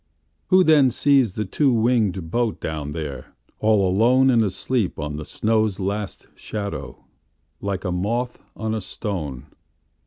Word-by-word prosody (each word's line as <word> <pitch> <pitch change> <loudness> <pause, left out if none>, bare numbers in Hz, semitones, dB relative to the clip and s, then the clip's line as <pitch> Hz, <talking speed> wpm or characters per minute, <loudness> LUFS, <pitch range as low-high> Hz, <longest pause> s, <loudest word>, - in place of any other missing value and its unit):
Who 185 0 +5
then 150 -5 +5
sees 130 -4 +3
the 105 - -2
two 135 +8 +2
wingedBoat 115 -2 +1
down 75 -2 -4
there, 75 -5 -6 0.2
all 105 -2 +3
aloneAnd 120 +3 +4
asleep 100 +1 -1
on 75 -1 -4
the 75 - -6
snow's 110 0 0
last 100 0 -3
shadow, 100 - -6 0.5
Like 100 -1 -3
a 90 - 0
moth 115 +8 -2 0.2
on 110 0 -2
a 110 - -2
stone? 80 - -5
105 Hz, 130 wpm, -23 LUFS, 90-120 Hz, 0.5 s, Who